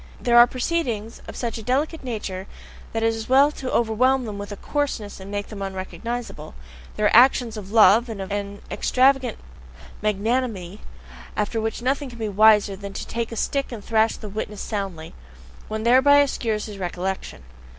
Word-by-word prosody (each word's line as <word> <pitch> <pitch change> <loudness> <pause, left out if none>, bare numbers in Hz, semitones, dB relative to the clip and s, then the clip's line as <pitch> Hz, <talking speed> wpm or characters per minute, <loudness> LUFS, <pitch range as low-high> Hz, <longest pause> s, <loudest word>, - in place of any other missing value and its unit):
There 240 -1 +5
are 240 - +9
proceedings 245 -5 -2
of - - -8
such 235 -2 -3
a - - -7
delicate 275 +8 -1
nature 205 -6 -5 0.4
that 225 0 -2
it 225 0 +3
is 225 +1 -6
well 275 +3 +6
to 260 -3 -6
overwhelm 250 +3 +2
them 205 -2 -6
with 205 +1 -7
coarseness 275 -10 -2
and 190 +1 -9
make 205 0 -4
them 210 -2 -8
unrecognizable; 195 - -5 0.4
there 210 - 0
are 210 - +4
actions 245 -1 +5
of 200 -2 -8
love 225 +2 +6
and 220 -3 -6
of 195 +1 -6
an 200 0 -4
extravagant 260 -2 +2 0.6
magnanimity 210 -2 -1 0.6
after 220 +2 -1
which 225 +2 -3
nothing 275 +2 0
can 240 - -11
be 220 -2 -3
wiser 210 0 +5
than 200 0 -8
to - - -5
take 230 0 -4
a - - -5
stick 275 +4 -1
and 220 -4 -8
thrash 225 0 +2
the 215 - -8
witness 210 0 -5
soundly: 195 -7 -5 0.5
one 220 0 -4
thereby 260 +4 +6
obscures 230 -6 +1
his 205 -2 -8
recollection. 180 - -4
220 Hz, 175 wpm, -23 LUFS, 205-250 Hz, 0.6 s, are